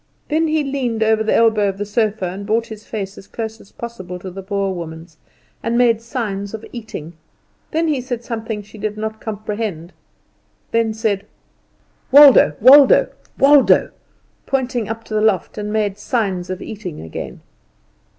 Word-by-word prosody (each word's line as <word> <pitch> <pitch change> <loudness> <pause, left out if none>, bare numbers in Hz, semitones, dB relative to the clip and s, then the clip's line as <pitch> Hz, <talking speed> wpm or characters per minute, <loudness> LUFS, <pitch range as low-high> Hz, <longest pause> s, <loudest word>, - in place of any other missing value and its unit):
Then 320 +2 +2
he 310 -1 +1
leaned 255 -5 -1
over 220 0 +2
the 220 - +1
elbow 220 -3 +3
of 195 - -5
the 205 - -3
sofa 210 -2 0
and 185 +3 -5
brought 220 +3 0
his 215 -2 -10
face 200 -3 -5
as 195 - -15
close 225 -1 -6
as 200 - -19
possible 185 -7 -7
to 185 +1 -8
the 195 +2 -7
Boer 195 0 -2
woman's, 165 -1 -8 0.4
and 230 +1 -1
made 235 -2 +3
signs 220 -4 -4
of 220 - -9
eating. 215 -9 -7 0.6
Then 325 +1 0
he 290 -5 0
said 245 -2 -5
something 225 -2 -4
she 210 +1 -14
did 215 0 -3
not 220 0 -5
comprehend; 210 -5 -5 0.8
then 225 -1 +1
said, 215 -3 -1 0.8
"Waldo, 280 -1 +8
Waldo, 270 +4 +7 0.3
Waldo," 280 0 +5 0.6
pointed 250 -4 -1
up 225 +1 -5
to 220 - -9
the 215 - +1
loft, 215 -1 +1
and 210 0 -4
made 210 -2 -1
signs 195 -6 -2
of 185 0 -5
eating 200 -7 -7
again. 80 0 -7
220 Hz, 165 wpm, -19 LUFS, 200-235 Hz, 0.8 s, Waldo